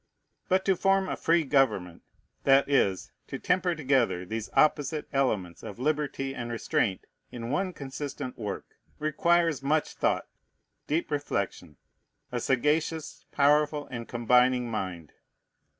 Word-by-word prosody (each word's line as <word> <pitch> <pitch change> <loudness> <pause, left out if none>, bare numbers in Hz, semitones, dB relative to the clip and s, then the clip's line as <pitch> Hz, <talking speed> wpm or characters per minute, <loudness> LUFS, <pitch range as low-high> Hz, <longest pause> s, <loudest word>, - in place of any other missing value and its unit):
But 190 +1 +2
to 195 - +3
form 195 +1 +2
a - - -2
free 165 0 +2
government, 130 - +1 0.4
that 135 0 +5
is, 100 -10 +1 0.2
to - - -5
temper 180 -1 +1
together 130 - +1
these 110 +3 -4
opposite 150 0 +2
elements 105 -11 0
of 100 - -8
liberty 140 0 -1
and 120 -3 -5
restraint 110 -4 -1 0.3
in 115 0 -5
one 185 +5 0
consistent 140 -3 -6
work, 105 -3 -5 0.3
requires 165 0 +2
much 150 +3 0
thought, - - 0 0.6
deep 155 +2 -1
reflection, 100 - -3 0.5
a 125 - -1
sagacious, 150 +5 0
powerful, 150 +1 +3
and 120 -2 -5
combining 125 +1 +3
mind. 90 -7 -4
135 Hz, 125 wpm, -28 LUFS, 115-155 Hz, 0.6 s, that